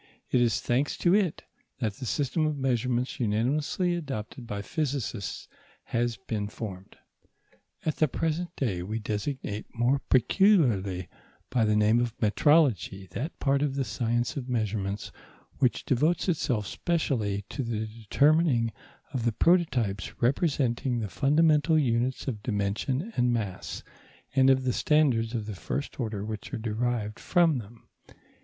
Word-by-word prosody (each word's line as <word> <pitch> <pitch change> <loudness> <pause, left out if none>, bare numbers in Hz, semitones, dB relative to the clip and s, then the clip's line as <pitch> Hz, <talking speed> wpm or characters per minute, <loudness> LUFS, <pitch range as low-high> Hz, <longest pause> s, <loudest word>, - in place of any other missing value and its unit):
It 125 - +4
is 120 -1 +2
thanks 130 +4 0
to 175 - +3
it 195 -6 +1 0.3
that 110 -5 -1
the 125 +4 -7
system 150 +5 0
of 150 -1 -2
measurements 125 -1 0
unanimously 135 - +1
adopted 130 -7 -5
by 100 -3 -4
physicists 130 - -3 0.4
has 120 -1 -1
been 105 -2 -3
formed. 100 -3 -8 0.9
At 155 - -1
the 155 - +4
present 165 +5 -2
day 100 -10 -1
we 105 +5 -3
designate 105 0 -3
more 120 +4 +2
peculiarly 120 - +3 0.4
by 120 -3 +3
the 105 0 +2
name 105 +2 +4
of 120 -1 -2
metrology 110 - +2
that 145 - -5
part 140 0 +2
of 145 -2 0
the 140 - 0
science 120 +4 -1
of 130 -3 -5
measurements 105 -4 -2 0.5
which 125 -3 +1
devotes 155 +9 +1
itself 130 - 0
specially 110 - -1
to 140 - -4
the 115 -3 -2
determining 120 +3 +2 0.4
of 125 - -1
the 115 - +2
prototypes 120 - +1
representing 130 -2 +1
the 110 -3 -3
fundamental 155 - +3
units 125 -2 0
of 110 -6 -3
dimension 115 - -1
and 125 0 +2
mass, 100 -6 -3 0.5
and 135 -1 +5
of 130 -1 +4
the 125 -1 +1
standards 125 -7 +2
of 110 -2 -2
the 110 - -5
first 140 +11 -4
order 110 -4 -3
which 110 -1 -6
are - - -2
derived 110 -1 -2
from 165 -6 +3
them. 115 +1 -13
120 Hz, 145 wpm, -28 LUFS, 110-145 Hz, 0.9 s, and